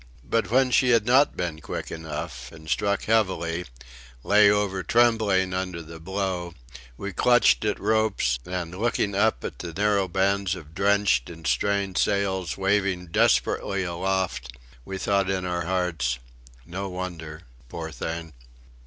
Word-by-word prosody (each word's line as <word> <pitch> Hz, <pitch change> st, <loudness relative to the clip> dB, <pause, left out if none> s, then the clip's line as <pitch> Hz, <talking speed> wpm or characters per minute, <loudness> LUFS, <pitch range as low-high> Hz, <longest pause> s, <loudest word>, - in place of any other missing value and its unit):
But 110 Hz, +6 st, 0 dB
when 130 Hz, +2 st, +3 dB
she 125 Hz, 0 st, +4 dB
had 115 Hz, -3 st, +4 dB
not 130 Hz, +4 st, +4 dB
been 85 Hz, -3 st, -3 dB
quick -, -, -5 dB
enough 75 Hz, -5 st, -6 dB
and, 80 Hz, -1 st, -13 dB
struck 100 Hz, +4 st, 0 dB
heavily, 90 Hz, -6 st, 0 dB, 0.6 s
lay 105 Hz, 0 st, +6 dB
over 100 Hz, -2 st, +1 dB
trembling 110 Hz, -5 st, +2 dB
under 90 Hz, -2 st, -3 dB
the 80 Hz, +1 st, -11 dB
blow, 90 Hz, -1 st, -3 dB, 0.4 s
we 100 Hz, -1 st, -5 dB
clutched 120 Hz, +4 st, +4 dB
at 105 Hz, -, 0 dB
ropes, 105 Hz, -, +1 dB
and 90 Hz, 0 st, -4 dB
looking 110 Hz, -3 st, 0 dB
up 110 Hz, +3 st, +1 dB
at -, -, -6 dB
the 85 Hz, -, -5 dB
narrow 100 Hz, +2 st, +1 dB
bands 95 Hz, +1 st, +1 dB
of 80 Hz, -3 st, -12 dB
drenched 100 Hz, -9 st, +2 dB
and 80 Hz, -2 st, -11 dB
strained 100 Hz, +1 st, 0 dB
sails 95 Hz, -4 st, 0 dB
waving 95 Hz, -2 st, 0 dB
desperately 100 Hz, +3 st, +2 dB
aloft, 85 Hz, -9 st, -2 dB, 0.3 s
we 95 Hz, -, -5 dB
thought 100 Hz, 0 st, +1 dB
in 95 Hz, -1 st, -1 dB
our 90 Hz, -1 st, -2 dB
hearts: 85 Hz, -9 st, 0 dB, 0.5 s
"No 95 Hz, +3 st, -5 dB
wonder. 85 Hz, -3 st, -6 dB, 0.3 s
Poor 80 Hz, +3 st, -6 dB
thing!" 80 Hz, +1 st, -5 dB
95 Hz, 145 wpm, -25 LUFS, 85-100 Hz, 0.6 s, lay